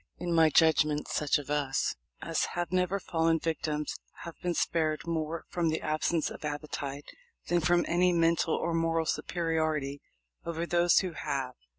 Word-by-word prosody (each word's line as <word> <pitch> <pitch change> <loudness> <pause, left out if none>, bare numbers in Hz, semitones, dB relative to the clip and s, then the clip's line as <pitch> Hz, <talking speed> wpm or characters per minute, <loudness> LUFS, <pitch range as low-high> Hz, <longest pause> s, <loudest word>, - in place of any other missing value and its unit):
In 175 -1 -2
my 165 -1 +6
judgment 155 -1 +3
such 150 -2 +1
of 145 0 -7
us 140 -2 0 0.3
as - - 0
have 175 0 -2
never 185 +1 +1
fallen 165 -2 +1
victims 155 -2 -2 0.3
have 170 - -7
been 175 -1 -1
spared 155 -2 0
more 165 -1 -3
from 170 -2 0
the 160 - 0
absence 155 +1 0
of - - -9
appetite 145 -1 -4 0.4
than 175 - +3
from 175 +2 +3
any 180 +1 +3
mental 165 -1 +2
or 170 - -1
moral 165 0 +1
superiority 155 -5 -1 0.4
over 170 0 -3
those 175 0 +4
who 185 -2 -3
have. 135 -4 -3
165 Hz, 160 wpm, -30 LUFS, 150-170 Hz, 0.4 s, my